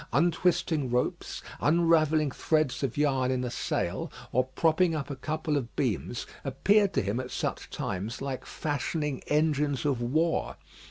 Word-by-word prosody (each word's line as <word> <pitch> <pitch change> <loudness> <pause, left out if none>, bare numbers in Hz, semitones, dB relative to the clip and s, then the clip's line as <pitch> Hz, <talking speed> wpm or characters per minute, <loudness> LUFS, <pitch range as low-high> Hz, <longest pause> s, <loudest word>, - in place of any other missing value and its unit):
Untwisting 160 -2 +2
ropes, 125 +1 -1 0.2
unravelling 155 -2 +3
threads 155 -1 +1
of 135 -2 -2
yarn 135 -3 +2
in 130 -1 0
a 125 - -3
sail, - - -2 0.2
or 130 +1 +2
propping 160 +5 +2
up 145 -1 -3
a - - -3
couple 155 +2 -1
of 120 -4 -4
beams, 120 -2 -1 0.2
appeared 200 +9 +3
to - - +1
him 100 +5 -1
at 130 -1 -4
such - - -3
times 100 +5 -4
like 135 -2 -4
fashioning 150 -1 -2
engines 150 -3 +1
of 135 -5 +1
war. 160 +7 +1
145 Hz, 150 wpm, -29 LUFS, 130-160 Hz, 0.2 s, unravelling